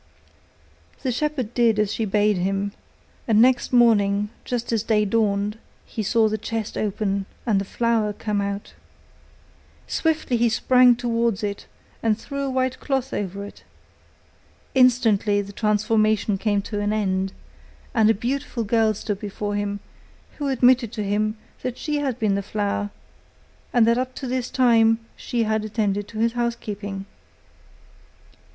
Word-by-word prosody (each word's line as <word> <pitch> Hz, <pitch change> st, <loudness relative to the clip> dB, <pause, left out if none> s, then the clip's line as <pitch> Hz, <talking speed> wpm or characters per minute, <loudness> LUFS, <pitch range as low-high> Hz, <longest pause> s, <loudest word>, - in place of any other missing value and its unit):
The 260 Hz, -, 0 dB
shepherd 255 Hz, -3 st, -2 dB
did 230 Hz, -3 st, +3 dB
as 210 Hz, -1 st, +1 dB
she 225 Hz, -, -1 dB
bade 210 Hz, 0 st, +2 dB
him, 195 Hz, +2 st, -1 dB, 0.6 s
and 220 Hz, -2 st, +4 dB
next 250 Hz, +1 st, +4 dB
morning 210 Hz, -4 st, +4 dB, 0.2 s
just 240 Hz, -1 st, -2 dB
as 225 Hz, -, +2 dB
day 215 Hz, -1 st, +2 dB
dawned, 210 Hz, 0 st, 0 dB, 0.3 s
he 220 Hz, -, -5 dB
saw 220 Hz, +2 st, +3 dB
the 215 Hz, 0 st, -2 dB
chest 220 Hz, 0 st, -4 dB
open, 200 Hz, -1 st, -1 dB, 0.2 s
and 210 Hz, -5 st, +2 dB
the -, -, -4 dB
flower 230 Hz, 0 st, 0 dB
come 205 Hz, 0 st, -2 dB
out. 200 Hz, 0 st, -4 dB, 1.1 s
Swiftly 315 Hz, -6 st, 0 dB
he 235 Hz, 0 st, +3 dB
sprang 250 Hz, +2 st, +5 dB
towards 235 Hz, -3 st, 0 dB
it, 200 Hz, -1 st, -4 dB, 0.3 s
and 220 Hz, -2 st, +2 dB
threw 280 Hz, +3 st, -5 dB
a 275 Hz, -, -1 dB
white 260 Hz, 0 st, -1 dB
cloth 270 Hz, -2 st, -2 dB
over 200 Hz, 0 st, -3 dB
it. 205 Hz, -, -13 dB, 1.1 s
Instantly 225 Hz, -5 st, +4 dB
the 200 Hz, 0 st, -5 dB
transformation 215 Hz, 0 st, +2 dB
came 205 Hz, -1 st, +1 dB
to 205 Hz, 0 st, -4 dB
an 205 Hz, 0 st, 0 dB
end, 190 Hz, -2 st, 0 dB, 0.6 s
and 220 Hz, -4 st, +4 dB
a 225 Hz, -, +4 dB
beautiful 250 Hz, +2 st, -2 dB
girl 220 Hz, 0 st, +2 dB
stood 205 Hz, 0 st, -4 dB
before 205 Hz, 0 st, -4 dB
him, 205 Hz, 0 st, -2 dB, 0.6 s
who 290 Hz, -, -1 dB
admitted 250 Hz, -3 st, +3 dB
to 215 Hz, -, -3 dB
him 215 Hz, +2 st, 0 dB, 0.2 s
that 250 Hz, -1 st, -4 dB
she 300 Hz, -1 st, -2 dB
had 270 Hz, -5 st, -1 dB
been 215 Hz, -4 st, +1 dB
the 200 Hz, -, 0 dB
flower, 205 Hz, 0 st, -2 dB, 0.8 s
and 240 Hz, -3 st, +4 dB
that 235 Hz, +2 st, +3 dB
up 255 Hz, 0 st, -3 dB
to 270 Hz, -, -6 dB
this 250 Hz, -1 st, -2 dB
time 230 Hz, -3 st, +4 dB, 0.2 s
she 235 Hz, -2 st, -2 dB
had 220 Hz, 0 st, 0 dB
attended 205 Hz, -2 st, -1 dB
to 220 Hz, -, -10 dB
his 230 Hz, +1 st, +1 dB
house 240 Hz, -1 st, 0 dB
keeping. 200 Hz, -3 st, -6 dB
220 Hz, 155 wpm, -23 LUFS, 205-240 Hz, 1.1 s, sprang